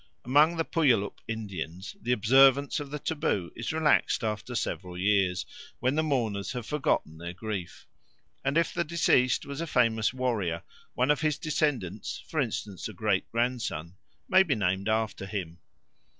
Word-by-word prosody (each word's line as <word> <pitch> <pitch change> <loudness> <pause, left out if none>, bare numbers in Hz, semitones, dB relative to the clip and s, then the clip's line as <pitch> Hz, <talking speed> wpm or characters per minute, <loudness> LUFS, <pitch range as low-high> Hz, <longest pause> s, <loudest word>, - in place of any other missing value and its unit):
Among 150 +6 +4
the 165 - 0
Puyallup 120 -11 +1
Indians 95 - -5
the 125 - -1
observance 135 +6 +5
of 145 -1 -6
the 150 - -4
taboo 145 - -1
is 120 - -3
relaxed 160 -5 +2
after 110 +3 -3
several 90 -5 -3
years, 95 -1 +2 0.3
when 130 +2 +1
the 155 - +2
mourners 115 -10 -1
have 125 -3 -5
forgotten 120 - -1
their 85 +1 -6
grief; 95 -2 -6 0.6
and 140 +3 +1
if 170 - +2
the 170 - 0
deceased 150 -6 +2
was 140 +2 -5
a 165 - -3
famous 115 -6 +2
warrior, 110 -10 -1 0.3
one 130 +4 +3
of 150 - +1
his 155 -2 +1
descendants, 145 - -2
for 160 - -2
instance 105 -6 -3
a 110 - -8
great 100 -1 0
grandson, 115 -8 -1 0.3
may 185 - +6
be 160 -8 +2
named 95 0 0
after 110 -3 -1
him. 90 -4 -5
115 Hz, 160 wpm, -28 LUFS, 100-145 Hz, 0.6 s, may